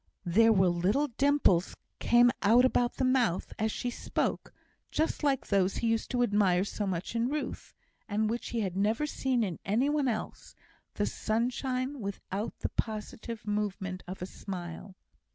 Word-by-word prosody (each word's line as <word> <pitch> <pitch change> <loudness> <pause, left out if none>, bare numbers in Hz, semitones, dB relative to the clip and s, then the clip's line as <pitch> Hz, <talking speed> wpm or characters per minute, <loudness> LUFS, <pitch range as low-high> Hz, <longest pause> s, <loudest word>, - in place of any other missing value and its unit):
There 225 +6 +5
were 190 -3 +4
little 195 +12 +1
dimples 265 -9 +2 0.2
came 240 0 +5
out 235 +5 +6
about 245 -1 +1
the 260 - 0
mouth 250 -8 +1
as 220 0 +1
she 245 +2 -3
spoke, - - -2 0.4
just 315 +1 -1
like 275 -3 +1
those 195 -1 +2
he 230 - 0
used 225 - -1
to 245 -1 +1
admire 200 -5 +3
so 205 0 -3
much 185 +4 -3
in 230 +1 +1
Ruth, 300 +1 -4 0.3
and 215 +1 +1
which 235 +2 -3
he 235 - -1
had 190 -3 -2
never 215 +8 +1
seen 260 -5 0
in 185 -6 -3
any 235 +8 +1
one 295 -2 +1
else 220 -3 -4 0.4
the - - 0
sunshine 255 +4 -1
without 200 +1 -5
the - - -1
positive 220 +1 -4
movement 200 -3 -2
of 185 0 -6
a - - -2
smile. 185 0 -7
220 Hz, 165 wpm, -30 LUFS, 195-245 Hz, 0.4 s, out